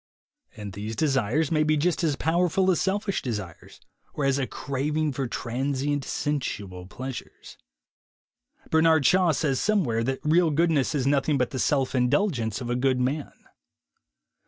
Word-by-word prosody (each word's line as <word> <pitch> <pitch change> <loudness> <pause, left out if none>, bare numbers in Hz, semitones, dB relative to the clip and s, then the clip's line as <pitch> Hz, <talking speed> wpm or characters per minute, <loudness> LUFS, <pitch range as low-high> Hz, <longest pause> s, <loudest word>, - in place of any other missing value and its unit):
And 105 -2 -7
these 105 +3 -5
desires 135 +1 +1
may 155 -1 +2
be 155 0 +2
just 175 +4 0
as 155 -4 +1
powerful 180 +4 +2
as 175 - 0
selfish 195 +1 -1
desires, 105 -9 -6 0.4
or 145 - -1
as 135 0 +2
a 130 - -1
craving 150 +3 -2
for 135 -1 -2
tran 130 +4 -3
sient 145 +1 -1
sensual 100 -11 -3
pleasures. 130 +5 -8 1.2
Bernard 160 -2 +4
Shaw 180 -2 +4
says 140 -3 0
some 215 -2 +2
where 115 -4 -1
that 130 +2 -1
real 165 +2 +3
goodness 155 -2 +1
is 135 -3 0
nothing 140 +1 +2
but 125 +1 0
the 130 - -4
self 135 -1 +1
indulgence 125 - 0
of 120 - -5
a - - +1
good 130 0 +1
man. 135 +4 -3
140 Hz, 160 wpm, -26 LUFS, 125-160 Hz, 1.2 s, Bernard